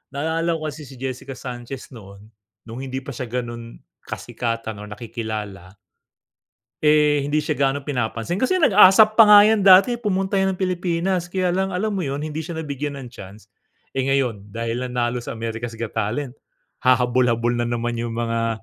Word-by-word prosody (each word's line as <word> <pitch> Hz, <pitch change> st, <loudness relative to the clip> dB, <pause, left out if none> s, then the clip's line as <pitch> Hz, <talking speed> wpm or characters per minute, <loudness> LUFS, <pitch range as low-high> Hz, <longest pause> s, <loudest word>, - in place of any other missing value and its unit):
Naaalala 165 Hz, +3 st, 0 dB
ko 160 Hz, -, -6 dB
kasi 150 Hz, -1 st, -10 dB
si 135 Hz, -, -12 dB
Jessica 130 Hz, +1 st, -6 dB
Sanchez 125 Hz, +1 st, -8 dB
noon, 100 Hz, -4 st, -13 dB, 0.4 s
nung 115 Hz, +2 st, -9 dB
hindi 130 Hz, 0 st, -5 dB
pa 140 Hz, -, -7 dB
siya 130 Hz, 0 st, -5 dB
ganun 120 Hz, -1 st, -6 dB, 0.3 s
kasikatan 115 Hz, -2 st, -4 dB
or 105 Hz, -, -8 dB
nakikilala 105 Hz, -4 st, -6 dB, 1.1 s
eh, 150 Hz, -2 st, +3 dB
hindi 150 Hz, +1 st, 0 dB
siya 150 Hz, 0 st, -2 dB
gaanong 140 Hz, 0 st, +1 dB
pinapansin. 125 Hz, +3 st, -3 dB
Kasi 255 Hz, -, +1 dB
nag-ASAP 210 Hz, +1 st, +6 dB
pa 225 Hz, -, +10 dB
nga 210 Hz, 0 st, +9 dB
yan 210 Hz, -1 st, +3 dB
dati, 195 Hz, +6 st, +7 dB
pumunta 195 Hz, -3 st, 0 dB
yan 190 Hz, 0 st, +1 dB
ng 185 Hz, -, -14 dB
Pilipinas 180 Hz, 0 st, -1 dB
kaya 185 Hz, 0 st, -1 dB
lang 190 Hz, +1 st, -1 dB
alam 215 Hz, +4 st, -1 dB
mo 190 Hz, -6 st, -2 dB
yun, 140 Hz, +2 st, -3 dB
hindi 155 Hz, 0 st, -5 dB
siya 160 Hz, +1 st, -5 dB
nabigyan 145 Hz, 0 st, -4 dB
ng 135 Hz, -3 st, -8 dB
chance. 105 Hz, -1 st, -13 dB, 0.5 s
Eh, 130 Hz, -, 0 dB
ngayon 125 Hz, -7 st, 0 dB
dahil 115 Hz, +2 st, -3 dB
nanalo 125 Hz, 0 st, -1 dB
sa 120 Hz, -, -6 dB
America's 115 Hz, +1 st, -5 dB
Got 115 Hz, -1 st, -5 dB
Talent, 120 Hz, +5 st, -3 dB, 0.4 s
hahabol-habol 120 Hz, -1 st, +2 dB
na 120 Hz, -, 0 dB
naman 120 Hz, 0 st, -2 dB
yung 115 Hz, -1 st, -3 dB
mga 115 Hz, -2 st, -2 dB
130 Hz, 170 wpm, -22 LUFS, 115-165 Hz, 1.1 s, pa